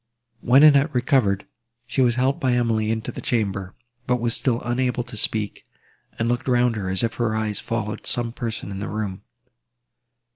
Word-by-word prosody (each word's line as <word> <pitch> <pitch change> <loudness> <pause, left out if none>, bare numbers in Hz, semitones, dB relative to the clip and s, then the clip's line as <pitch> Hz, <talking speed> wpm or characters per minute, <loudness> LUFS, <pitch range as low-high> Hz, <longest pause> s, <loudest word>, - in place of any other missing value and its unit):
When 130 +5 +5
Annette 145 -1 +5
recovered, 125 -6 +2 0.4
she 130 +2 -1
was 120 -2 +3
helped 130 +2 +1
by 130 -2 +1
Emily 115 -3 +1
into 110 0 -2
the - - -8
chamber, 100 -5 -2 0.3
but 125 - +3
was 115 -1 +1
still 120 -3 0
unable 125 0 0
to 120 -1 -9
speak, 105 -1 -2 0.5
and 115 - 0
looked 120 +1 -1
round 125 -2 +3
her, 100 -3 -3
as 95 +3 0
if 115 - 0
her 110 -2 +1
eyes 110 -1 -1
followed 110 -2 -4
some 120 -1 +1
person 115 -4 -5
in 95 - -5
the 100 - -4
room. 105 -3 -4
115 Hz, 180 wpm, -23 LUFS, 110-125 Hz, 0.5 s, When